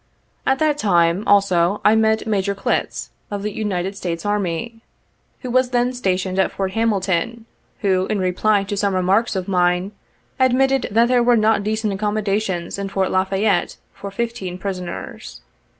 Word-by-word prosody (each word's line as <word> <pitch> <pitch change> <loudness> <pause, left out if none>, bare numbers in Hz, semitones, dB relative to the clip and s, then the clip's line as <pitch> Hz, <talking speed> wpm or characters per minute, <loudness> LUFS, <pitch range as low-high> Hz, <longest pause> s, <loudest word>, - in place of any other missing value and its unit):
At 265 - +3
that 300 0 +1
time, 175 -2 +2
also, 195 -1 +3
I 215 - +6
met 220 0 +2
Major 200 -2 0
Clttz, 195 - -2 0.2
of 205 -1 -4
the 210 - -2
United 195 -2 -2
States 170 -3 -4
Army, 205 +2 -2 0.6
who 250 - -5
was 255 0 +3
then 245 0 +1
stationed 190 -5 -1
at 190 - +2
Fort 190 -1 -3
Hamilton, 215 0 -1 0.4
who, 190 -2 +1
in 215 - -1
reply 195 +2 +1
to 200 +1 -4
some 200 -1 0
remarks 195 +5 +2
of 185 -1 -3
mine, 180 0 +1 0.5
admitted 265 +1 +3
that 230 +3 +3
there 250 0 +3
were 240 0 +4
not 215 -1 +2
decent 215 0 -1
accommodations 200 -3 -2
in 200 0 -3
Fort 190 -1 -1
La 185 0 +2
Fayette 195 -1 0 0.2
for 200 0 -7
fifteen 195 -4 -4
prisoners. 185 -3 -6
200 Hz, 160 wpm, -20 LUFS, 185-220 Hz, 0.6 s, I